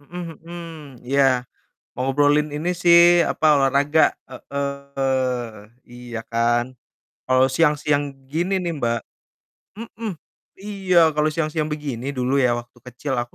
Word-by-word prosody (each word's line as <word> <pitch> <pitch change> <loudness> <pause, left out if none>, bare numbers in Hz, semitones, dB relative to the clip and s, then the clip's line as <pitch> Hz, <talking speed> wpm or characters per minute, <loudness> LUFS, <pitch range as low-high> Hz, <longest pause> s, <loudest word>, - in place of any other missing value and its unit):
mhm 170 +3 -8
mhm, 170 +1 -9 0.4
iya. 130 -1 +2 0.5
Ngobrolin 145 +3 +2
ini 155 +4 -2
sih, 170 0 +6
apa, 155 - 0
olahraga, 140 +3 +3 0.2
heeh, 130 -4 -3 0.2
iya 120 -1 -7
kan. 120 +2 0 0.5
Kalau 130 +1 +3
siang-siang 145 0 +1 0.2
gini 180 +6 -1
nih, 175 -1 -2
Mbak 115 -3 -1 0.8
mhm, 225 -1 -6 0.5
iya, 185 -5 +3
kalau 150 0 +1
siang-siang 155 -1 -1
begini 140 -5 -5
dulu 130 +2 0
ya 125 -3 +3
waktu 120 +1 -12
kecil 125 +3 -4
aku 120 0 -4
140 Hz, 115 wpm, -22 LUFS, 125-160 Hz, 0.8 s, sih